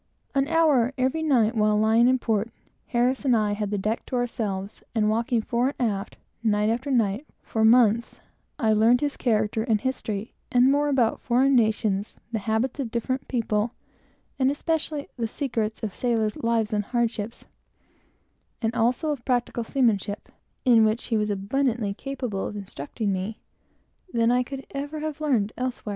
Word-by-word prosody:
An 275 0 +2
hour, 295 -6 +3
every 260 +5 0
night, 250 -8 +3
while 210 -1 +3
lying 220 +3 +4
in 260 +1 +4
port, 225 -2 0 0.4
Harris 250 +3 +1
and 260 -3 +3
myself 210 -2 +1
had 210 -2 -1
the 205 - -1
deck 215 +4 -1
to - - -3
ourselves, 215 -5 -3
and 215 -1 +2
walking 230 +1 0
fore 245 +5 0
and 240 -4 +1
aft, 200 +1 -6 0.2
night 210 -1 +2
after 245 +5 -2
night, 235 +1 +1 0.2
for 220 - -1
months, 230 0 +4 0.4
I 220 -2 +2
learned 225 +3 +4
his 290 -1 0
whole - - -17
character 220 -2 +1
and 220 -2 +1
history, 220 -4 -3 0.2
and 250 +2 +5
more 290 +1 +2
about 255 -5 +1
foreign 260 +2 +3
nations, 215 -3 +1 0.2
the 225 - -1
habits 220 +7 -1
of 260 -4 -2
different 255 +3 -2
people, 225 -2 -1 0.6
and 260 0 +4
especially 300 0 -2
the 230 -2 -1
secrets 225 -4 -3
of 210 -3 -3
sailors' 225 -4 0
lives 230 -1 0
and 210 0 +1
hardships, 235 -2 -2 1.1
and 225 0 -1
also 245 +6 +1
of 275 -5 -4
practical 245 -2 0
seamanship, 220 -5 0 0.4
(in 235 -3 +6
which 220 +2 +1
he 230 - +1
was 210 0 0
abundantly 215 +1 0
capable 250 -5 -4
of - - -7
instructing 200 - -4
me,) 190 +4 -4 0.7
than 230 0 +2
I 250 +1 +3
could 270 +2 -6
ever 290 +2 -4
have 310 -1 -4
learned 235 -9 +1
elsewhere. 250 -3 -3
235 Hz, 170 wpm, -25 LUFS, 215-260 Hz, 1.1 s, in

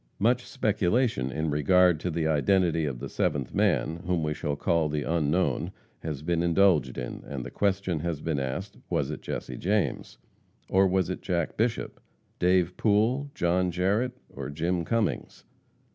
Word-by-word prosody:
Much 120 +4 +2
speculation 105 - +1
in 80 +3 -1
regard 90 +3 +4
to 90 - -2
the 80 -1 -1
identity 80 +1 +2
of 70 -4 -3
the - - -6
seventh 70 -4 -1
man, 80 - +1
whom 90 -3 +1
we 75 0 0
shall 75 -1 -2
call 80 +1 +1
the 75 -1 -1
Unknown, 80 +4 0 0.3
has 75 -3 -5
been 85 0 0
indulged 85 -3 +3
in, 60 - -5
and 65 -3 -5
the - - -7
question 95 -4 0
has 85 -1 -2
been 75 -2 -1
asked, 70 +10 -4
Was - - 0
it - - -6
Jesse 65 - -5
James? 100 - -1 0.5
or 95 +1 +4
was 95 -1 +1
it - - -5
Jack 85 -4 -1
Bishop, 115 +1 -1 0.4
Dave 90 -1 +2
Pool, 115 +7 +2
John 90 +1 +1
Jarrette 100 +8 0 0.2
or - - -5
Jim 85 +3 -1
Cummings? 115 +1 -2
85 Hz, 160 wpm, -27 LUFS, 75-95 Hz, 0.5 s, regard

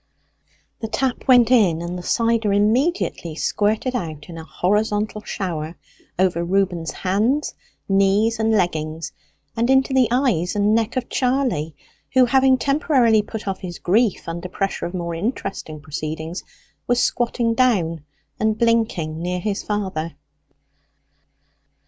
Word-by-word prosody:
The 225 - -4
tap 250 +3 -2
went 245 -2 +6
in, 195 -10 +4
and 170 +1 -4
the 180 - -5
cider 230 +2 +1
immediately 215 - +1
squirted 215 +8 0
out 155 -8 -5
in 165 - -8
a - - -8
horizontal 210 +4 0
shower 165 -6 -4 0.4
over 180 -2 +1
Reuben's 175 -2 0
hands, 220 +10 0 0.3
knees, 200 +4 +2
and 220 0 +2
leggings, 160 -6 -1 0.4
and 235 +2 0
into 265 0 +3
the 260 -2 +4
eyes 235 - +1
and 205 +1 +2
neck 225 +2 0
of 250 - -2
Charley, 250 - 0 0.4
who, 255 -1 +7
having 265 +1 +4
temporarily 260 -5 +3
put 210 0 -7
off 190 -1 -2
his 175 -2 -7
grief 215 +4 +1
under 170 +2 -5
pressure 195 0 -2
of 175 - -7
more 170 -1 -3
interesting 195 - -4
proceedings, 155 +3 -5 0.4
was 245 0 +2
squatting 235 -1 +1
down 185 - +1 0.4
and 220 0 +1
blinking 215 -9 0
near 180 +1 -2
his 200 +2 -2
father. 190 -7 -3
205 Hz, 135 wpm, -21 LUFS, 170-235 Hz, 0.4 s, who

